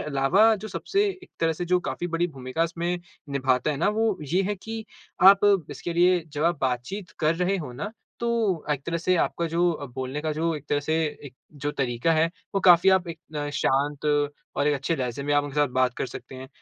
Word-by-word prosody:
अलावा 150 +11 +3
जो 215 +1 -7
सबसे 205 - 0 0.2
एक - - -15
तरह 165 0 +2
से 170 +3 -4
जो 180 +1 +2
काफ़ी 175 - -3
बड़ी 170 +1 0
भूमिका 135 0 -3
इसमें 170 +1 -2 0.3
निभाता 130 0 +1
है 145 - -2
ना 140 - +1
वो 215 -1 +1 0.2
ये 190 - +3
है 205 +2 -1
कि 220 0 -5 0.5
आप 200 0 +4 0.3
इसके 155 +4 -5
लिए 175 0 +4
जब 150 +2 -1
आप 170 -3 +2
बातचीत 135 +9 -2
कर 155 +1 +3
रहे 180 +3 0
हो 150 -8 -6
ना, 200 +12 -5 0.3
तो 230 -8 0
एक 140 -2 0
तरह 170 0 -1
से 185 +2 +1
आपका 170 0 0
जो 170 +2 +2
अ, 145 -3 -6
बोलने 130 +3 -5
का 155 0 -2
जो 165 +2 0
एक 145 - -10
तरह 145 - +1
से 155 +2 -1 0.3
एक 130 -3 -10 0.2
जो 145 0 -3
तरीका 130 +4 0
है, 160 +1 +2 0.2
वो 195 - +2
काफ़ी 175 0 +6
आप 185 -2 +2
एक 165 -1 -6 0.4
शांत 140 +2 0 0.5
और 145 - +1
एक 145 - +3
अच्छे 140 +4 -1
लहज़े 125 +1 -3
में 145 +1 -1
आप 145 0 +3
उनके 145 - -7
साथ 145 -2 +3
बात 130 -1 +2
कर - - -2
सकते 130 - -10
हैं। 130 +1 -9
165 Hz, 225 wpm, -25 LUFS, 140-180 Hz, 0.5 s, काफ़ी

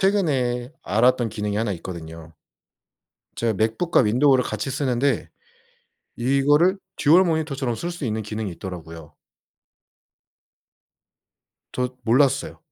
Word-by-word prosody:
최근에 135 - +1
알았던 120 +3 +2
기능이 105 -1 -3
1 110 -1 0
있거든요. 80 -2 -9 1.0
제가 115 -1 0
맥북과 110 - +1
윈도우를 125 +3 +3
같이 135 - -3
쓰는데 135 0 0 0.9
이거를 145 +9 +3 0.2
듀얼 165 +6 +5
모니터처럼 145 -7 -1
쓸 175 +8 -4
수 175 -5 -6
있는 110 -1 -2
기능이 105 -1 -4
있더라고요. 80 -4 -9 2.6
저 125 0 -3
몰랐어요. 135 +3 +2
125 Hz, 255 characters per minute, -23 LUFS, 105-140 Hz, 2.6 s, 듀얼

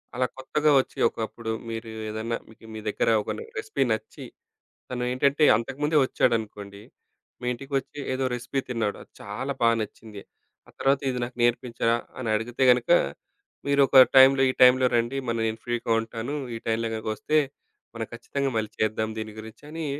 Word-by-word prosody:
అలా 125 +1 +1
కొత్తగా 150 +3 +1
వచ్చి 130 - -4
ఒకప్పుడు 110 0 -5 0.2
మీరు 115 0 -5 0.2
ఏదన్నా 110 +2 -3
మీకు 110 0 -17
మీ - - -5
దగ్గర 105 - +1
ఒక - - -8 0.3
రెసిపీ 430 0 -1
నచ్చి 470 +1 -4 0.7
తను 125 -1 -3
ఏంటంటే, 140 +4 +1
అంతకుముందే 150 +7 -2
వచ్చాడనుకోండి, 105 -5 -1 0.6
మీ 125 - -5
ఇంటికొచ్చి 135 +3 -4
ఏదో 130 0 -1
రెసిపీ 120 +3 -4
తిన్నాడు, 115 -4 -1
అది - - -19
చాలా 125 +7 -4
బాగా 115 0 +4
నచ్చింది. 105 -1 -9 0.5
ఆ - - -14
తరువాత 135 0 +2
ఇది 125 - -3
నాకు 120 0 -9
నేర్పించరా? 120 -1 +1 0.2
అని 125 -3 -4
అడిగితే 120 +4 -2
గనుక, 125 -1 +2 0.8
మీరు 140 0 +3
ఒక 135 - +1 0.2
టైంలో 135 0 +8
ఈ - - -1
టైంలో 125 0 +7
రండి, 120 +3 0
మ - - +2 0.2
నేను 110 0 -2
ఫ్రీ‌గా 120 -1 -1
ఉంటాను. 115 +5 -5 0.2
ఈ - - -4
టైంలో‌ 115 0 0
గనుక 110 0 -5
వస్తే 155 - +1 0.6
మనం 115 -1 -4
ఖచ్చితంగా 135 +4 -3
మళ్ళీ 110 -1 -1
చేద్దాం 110 0 0
దీని 110 -1 -5
గురించని 150 +9 -8
120 Hz, 160 wpm, -26 LUFS, 110-135 Hz, 0.8 s, టైంలో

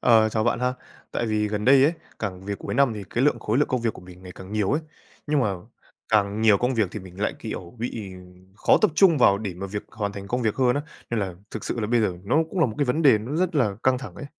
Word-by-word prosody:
Ờ, 110 -2 +5
chào 110 0 -1
bạn 120 0 +1
ha. 125 0 0 0.4
Tại 120 - -1
vì 105 -1 0
gần 105 0 -3
đây 135 +1 +6
ấy, 155 - +4 0.3
càng 95 -3 -5
về 100 - -3
cuối - - -6
năm 140 -4 +3
thì 105 - -6
cái 120 - +1
lượng 145 -5 +3
khối 110 +2 0
lượng 145 - +2
công 125 - 0
việc 115 -1 0
của - - -12
mình 90 0 -14
ngày 90 -1 -10
càng 95 +2 -11
nhiều 105 -2 +1
ấy. 150 - +1 0.5
Nhưng 150 -1 +2
mà 105 -6 +1 0.5
càng 105 -1 +2
nhiều 110 -3 +5
công 125 +4 0
việc 110 -5 +1
thì 105 - -5
mình 95 +1 -12
lại, 105 - 0
kiểu, 85 +2 -7
bị, 110 -4 -5
ừm, 90 +1 -16
khó - - +4
tập - - +5
trung 170 -6 +5
vào 100 -5 +5
để 100 -4 -5
mà 95 +3 -5
việc 105 +1 -5
hoàn 105 -2 -3
thành 100 0 -8
công 125 +1 -1
việc 110 -3 +1
hơn 125 -2 +3
á. 145 - -1 0.3
Nên 115 - 0
là 95 -3 -3 0.2
thực 110 - -6
sự 120 - -3
là 105 - -1
bây 120 +1 +2
giờ 105 -4 +1
nó 105 - +1
cũng 185 - -2
là - - +5
một 110 - -5
cái 145 - +3
vấn 145 +5 0
đề 130 -7 +6
nó 130 +9 -4
rất 180 0 0
là 110 -9 +1
căng 130 -1 +3
thẳng 130 - -9
ấy. 145 - -8
110 Hz, 295 wpm, -24 LUFS, 100-125 Hz, 0.5 s, đây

